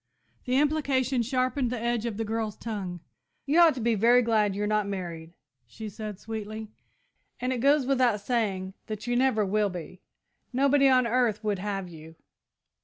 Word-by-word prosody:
The 255 0 +1
implication 275 -4 +1
sharpened 255 +1 0
the 245 -1 -3
edge 235 0 -1
of 220 -3 -4
the 225 - -2
girl's 220 -1 -2
tongue. 190 -6 -5 0.4
"You 295 +5 +3
ought 335 -5 +6
to - - -5
be 235 0 +1
very 235 +4 +4
glad 215 -4 +2
you're 205 +1 -1
not 210 -1 +1
married," 170 -4 -6 0.3
she 215 - -8
said 215 -1 -7
sweetly; 220 -1 -6 0.7
"and 250 +1 -1
it 250 - -3
goes 280 +2 +3
without 250 -5 +2
saying 200 -4 -1
that 215 0 -5
you 245 - 0
never 245 -4 +2
will 205 +1 +1
be. 180 0 -8 0.5
Nobody 275 +2 +4
on 255 -1 +4
earth 235 -3 +1
would 205 -3 -1
have 195 -1 -3
you!" 160 -1 -12
225 Hz, 175 wpm, -27 LUFS, 205-255 Hz, 0.7 s, ought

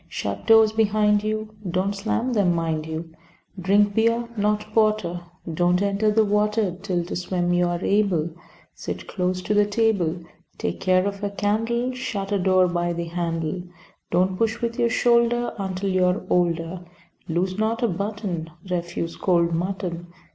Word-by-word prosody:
Shut 100 - -5
doors 225 -1 +7
behind 210 -1 +2
you, 215 0 -3 0.2
(Don't 185 +3 0
slam 230 +5 -1
them, 190 -6 +2
mind 160 -2 -1
you.) 160 +1 -5 0.5
Drink 200 +3 +3
beer, 230 +2 +2
not 210 0 +1
porter. 215 -6 +1 0.3
Don't 175 +2 +2
enter 200 +2 +1
the 215 +1 +3
water 210 -2 +1
Till 180 -3 -1
to - - -5
swim 175 0 -1
you 175 0 +3
are 175 +1 -2
able. 190 -6 +2 0.4
Sit - - -6
close 185 -1 -2
to 210 - 0
the 205 0 +4
table. 205 -6 +1 0.4
Take - - -3
care 185 0 +3
of 200 0 -4
a 205 - 0
candle. 225 +5 0
Shut 205 -6 -4
a 200 - +2
door 185 0 +4
by 175 0 -1
the 170 0 -3
handle, 165 0 -2 0.5
Don't 185 +2 +1
push 225 +2 0
with 235 0 -3
your 235 - +3
shoulder 240 0 +2
Until 190 0 -2
you 185 -1 +3
are 180 +1 +1
older. 175 0 0 0.5
Lose 185 +4 -1
not 225 +2 0
a - - +4
button. 200 -4 -3 0.2
Refuse 170 -2 -3
cold 170 -2 +2
mutton. 175 0 -3
195 Hz, 160 wpm, -24 LUFS, 175-215 Hz, 0.5 s, doors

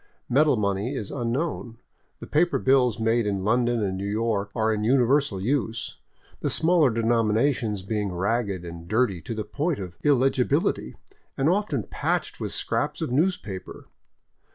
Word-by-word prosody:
Metal 145 +1 +3
money 100 +5 -1
is 105 -6 -5
unknown; 120 -1 -3 0.4
the - - -8
paper 175 +3 +2
bills 130 -4 +3
made 115 0 +1
in 100 -2 -1
London 120 +1 +2
and 95 -2 -1
New 100 +1 -3
York 105 -1 -1
are 110 -1 +2
in 105 0 -2
universal 130 -2 +2
use, 115 0 -2 0.4
the - - -1
smaller 165 -4 +3
denominations 115 -1 +1
being 105 -1 -2
ragged 100 0 -1
and 85 0 -9
dirty 105 -3 +1
to 115 - -5
the 110 - -3
point 150 +9 -2
of 90 -3 -8
illegibil 135 -2 +2
ity, - - -9 0.4
and 135 - +2
often 180 - 0
patched - - -2
with - - -3
scraps - - -1
of - - -3
newspaper. 135 - -2
115 Hz, 155 wpm, -25 LUFS, 105-135 Hz, 0.4 s, Metal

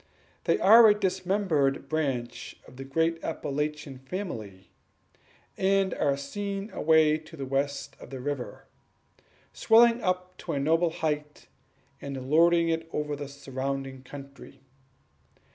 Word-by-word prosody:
They - - +3
are 225 +3 +8
a 205 - +5
dismembered 185 -8 0
branch 135 -6 -3
of 125 - -15
the 135 - -6
great 165 +4 -1
Appalachian 150 -3 -3
family, 115 - -7 0.9
and 195 -1 +2
are 140 -1 0
seen 200 +8 -5
away 155 -1 +3
to 160 +1 -14
the 135 - -4
west 140 +2 -2
of - - -12
the 135 - -7
river, 140 -1 -5 0.9
swelling 235 +1 +5
up 185 -1 -2
to - - -4
a 140 - -1
noble 165 +4 +2
height, 150 -2 -3 0.6
and 135 -1 -6
lording 170 +1 +5
it 165 0 -2
over 150 -1 -2
the 145 0 -6
surrounding 135 -1 -5
country. 140 0 -12
150 Hz, 125 wpm, -27 LUFS, 135-175 Hz, 0.9 s, are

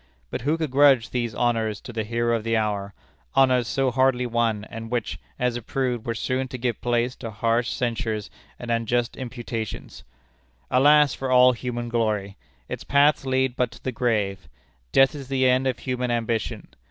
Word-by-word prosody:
But - - -3
who 150 +6 +1
could 160 -4 -3
grudge 135 -5 +5
these 120 -3 -2
honors 115 -3 0
to 120 - -9
the 110 -1 -2
hero 115 +2 0
of 115 - -3
the 115 0 +1
hour 100 -2 -2 0.4
honors 130 -3 +4
so 135 0 +1
hardly 130 0 +2
won, 115 -3 0
and 115 0 -8
which, 120 -2 -2 0.2
as 125 -1 0
it 120 -2 -7
proved, 125 -4 -2
were 115 - -1
soon 130 +3 -1
to 130 - -6
give 120 -1 -2
place 120 +1 0
to 115 - -6
harsh 115 +2 0
censures 115 -3 -2 0.3
and 120 -1 -5
unjust 115 +1 0
imputations? 120 -4 -6 0.7
Alas 145 +1 +5
for 135 - -4
all 125 0 +7
human 120 -1 -4
glory! 105 -4 -1 0.3
Its - - -6
paths 140 0 +3
lead 130 -1 +1
but 125 -2 +1
to - - -15
the 130 - -2
grave. 105 - -1 0.4
Death 135 0 +5
is 140 -3 -8
the 130 -1 +2
end 130 +1 +3
of 130 - 0
human 125 -1 -3
ambition. 115 -2 -2
120 Hz, 180 wpm, -24 LUFS, 115-130 Hz, 0.7 s, all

